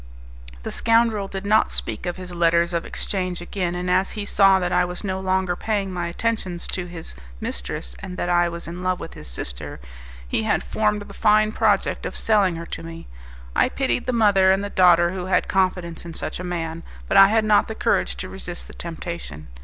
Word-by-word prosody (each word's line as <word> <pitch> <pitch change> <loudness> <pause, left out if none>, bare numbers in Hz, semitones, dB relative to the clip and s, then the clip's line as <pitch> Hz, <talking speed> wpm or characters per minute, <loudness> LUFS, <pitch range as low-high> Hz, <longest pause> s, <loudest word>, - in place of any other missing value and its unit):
The - - -4
scoundrel 230 -3 +2
did 195 0 -6
not 215 +2 +3
speak - - -2
of 175 - -3
his 180 -1 -7
letters 170 0 +2
of 170 - -1
exchange 185 -3 -3
again, 175 0 -3
and 180 +1 -3
as 185 +2 +2
he 210 -1 -4
saw 195 -1 +5
that 180 -1 -1
I 180 - +3
was 180 +2 -5
no 190 -2 -2
longer 190 -1 0
paying 200 -2 -2
my 175 -1 -2
attentions 185 -2 -2
to 180 -1 -2
his 175 - -8 0.3
mistress, 60 0 -4
and 180 -1 -7
that - - -2
I 175 0 +3
was 170 0 -7
in 175 +2 -6
love 185 0 0
with - - -8
his 75 - -11
sister, - - -6 0.5
he 90 - 0
had 110 - +1
formed 210 -1 0
the - - -12
fine 215 0 +3
project - - +1
of - - -6
selling 205 -5 +3
her 165 0 -6
to - - -6
me. 165 0 -9 0.5
I - - +4
pitied 260 -2 -1
the - - +2
mother 205 -5 +4
and 195 +1 +2
the 205 - -4
daughter 175 -2 +5
who 185 -1 -4
had 190 - +2
confidence 180 -3 0
in 170 -1 -8
such 155 - -5
a - - -5
man; 165 -2 -3 0.3
but - - 0
I 195 0 +10
had 220 +1 +2
not 210 -1 +4
the 220 - -5
courage - - +1
to 185 - -5
resist 180 -2 -6
the - - -12
temptation. 170 - -7
180 Hz, 215 wpm, -23 LUFS, 170-200 Hz, 0.5 s, I